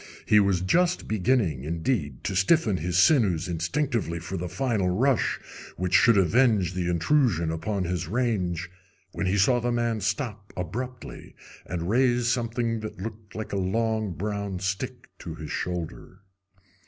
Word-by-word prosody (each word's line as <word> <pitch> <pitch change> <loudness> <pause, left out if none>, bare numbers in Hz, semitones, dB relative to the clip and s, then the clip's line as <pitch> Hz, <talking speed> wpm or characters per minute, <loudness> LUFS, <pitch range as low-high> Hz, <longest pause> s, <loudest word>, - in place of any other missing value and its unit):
He 105 - +5
was 100 -3 +2
just 175 - +1
beginning, 105 - +1
indeed, 80 - -2
to 100 - -2
stiffen 100 - +3
his 90 +2 -1
sinews 95 - +4
instinctively 90 - -1
for 85 +3 -6
the 90 -1 -3
final 115 -8 0
rush 125 +8 +1 0.4
which 90 +1 -2
should 115 -3 +6
avenge 100 -1 +3
the 90 -1 -1
intrusion 85 - +2
upon 95 +5 -2
his 85 -2 -2
range, 95 -6 -1 0.4
when 95 - -2
he 95 +2 +1
saw 120 +5 +4
the 120 +1 -1
man 120 -2 0
stop 105 -1 -3
abruptly 120 +8 -6 0.3
and 85 -1 -3
raise 120 +2 +2
something 115 -1 0
that 110 -3 -7
looked 110 +1 -8
like 110 -1 -5
a - - 0
long 110 +1 0
brown 100 +1 -3
stick 105 +7 -4
to 80 -2 -7
his 80 -2 -7
shoulder. 90 +2 -5
100 Hz, 150 wpm, -26 LUFS, 90-120 Hz, 0.4 s, should